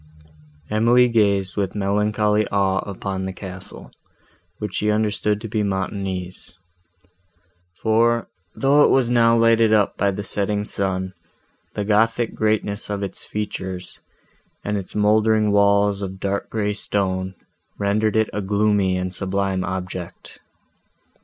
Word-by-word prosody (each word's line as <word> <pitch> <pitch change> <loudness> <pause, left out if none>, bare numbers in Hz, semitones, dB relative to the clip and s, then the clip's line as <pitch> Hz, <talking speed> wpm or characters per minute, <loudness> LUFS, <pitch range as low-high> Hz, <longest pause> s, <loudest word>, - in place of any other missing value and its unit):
Emily 120 +3 +4
gazed 100 -4 +2
with 100 -3 -2
melancholy 105 +1 +1
awe 95 -1 +1
upon 95 -1 -4
the 95 - -3
castle, 90 0 -10 0.7
which 105 -3 -5
she 105 - 0
understood 105 -1 0
to 115 - -5
be 110 0 -1
Montoni's; 95 -3 -4 1.3
for, 115 +1 +2 0.3
though 140 +2 +4
it - - +5
was 125 -3 +3
now 115 -1 +4
lighted 115 -1 +4
up 105 -2 +2
by 100 - +2
the 100 +1 -3
setting 105 +1 -1
sun, 95 -2 -2 0.6
the 105 - -2
gothic 115 +2 +2
greatness 105 -1 -1
of 100 -1 -3
its 100 - -5
features, 95 -3 -5 0.7
and 105 - -1
its 95 -2 -5
mouldering 105 0 +3
walls 100 0 +3
of 95 -1 -5
dark 100 +1 -2
grey 105 -2 -1
stone, 95 -2 -2 0.4
rendered 105 +1 +1
it 110 -1 +2
a 105 - -2
gloomy 100 -1 +1
and 90 0 -3
sublime 95 0 -1
object. 90 -1 -6
100 Hz, 130 wpm, -22 LUFS, 95-110 Hz, 1.3 s, it